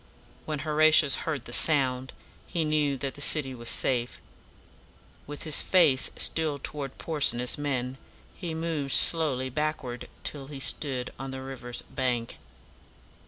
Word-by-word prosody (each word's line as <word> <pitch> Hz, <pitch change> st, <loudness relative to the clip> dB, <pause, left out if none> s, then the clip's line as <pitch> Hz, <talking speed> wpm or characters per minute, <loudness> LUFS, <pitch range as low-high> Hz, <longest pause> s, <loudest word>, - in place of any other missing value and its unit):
When 155 Hz, -, -4 dB
Horatius 155 Hz, -2 st, +5 dB
heard 145 Hz, -6 st, -4 dB
the 120 Hz, -, -6 dB
sound, 130 Hz, -4 st, +1 dB, 0.4 s
he 170 Hz, -3 st, -3 dB
knew 150 Hz, -2 st, -1 dB
that 135 Hz, +1 st, -5 dB
the 145 Hz, -, -11 dB
city 145 Hz, -2 st, +3 dB
was 120 Hz, -2 st, -3 dB
safe. 125 Hz, -2 st, 0 dB, 1.1 s
With 145 Hz, 0 st, -7 dB
his 155 Hz, -2 st, +5 dB
face 155 Hz, -8 st, +2 dB
still 155 Hz, -3 st, +1 dB
toward 140 Hz, -1 st, -6 dB
Porsena's 140 Hz, -6 st, 0 dB
men, 135 Hz, -3 st, -4 dB, 0.3 s
he 170 Hz, -4 st, -7 dB
moved 160 Hz, -4 st, -3 dB
slowly 135 Hz, -6 st, +5 dB
back 155 Hz, +3 st, -3 dB
ward 125 Hz, -1 st, -8 dB
till 140 Hz, -2 st, -5 dB
he 140 Hz, -1 st, -9 dB
stood 130 Hz, -2 st, 0 dB
on 135 Hz, 0 st, -6 dB
the 130 Hz, 0 st, -8 dB
river's 125 Hz, -2 st, -6 dB
bank. 125 Hz, -3 st, -4 dB
140 Hz, 140 wpm, -26 LUFS, 130-155 Hz, 1.1 s, Horatius